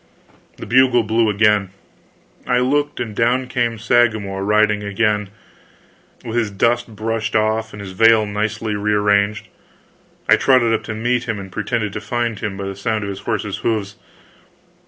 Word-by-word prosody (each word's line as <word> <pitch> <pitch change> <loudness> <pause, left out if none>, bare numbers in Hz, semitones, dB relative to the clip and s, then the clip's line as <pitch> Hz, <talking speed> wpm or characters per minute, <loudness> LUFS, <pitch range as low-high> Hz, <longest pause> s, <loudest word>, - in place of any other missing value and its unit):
The - - -8
bugle 125 -1 +4
blew 110 +1 +1
again. 105 -2 +2 0.8
I 125 - +2
looked, 145 +4 0
and 110 -3 -4
down 125 +4 +1
came 120 -2 -1
Sagramor 110 -3 +1
riding 105 0 +2
again, 105 0 0 1.0
with 115 +1 -3
his 115 -3 +1
dust 115 +3 0
brushed 110 0 -3
off 110 +1 +1
and 105 - -10
his 100 -2 -7
veil 115 +2 +4
nicely 105 +1 -2
re 105 +1 -1
arranged. 105 0 +1 0.8
I - - +6
trotted 125 -4 +3
up 110 - 0
to 110 - -5
meet 120 +2 0
him, 110 -3 -3
and 95 -1 -9
pretended 110 -2 -2
to 105 - -5
find 115 -1 -2
him 100 -3 -4
by 100 - -5
the 95 0 -5
sound 110 +2 -2
of 100 - -3
his 95 - -7
horse's 105 -3 -3
hoofs. 105 -3 -2
110 Hz, 165 wpm, -19 LUFS, 105-115 Hz, 1.0 s, I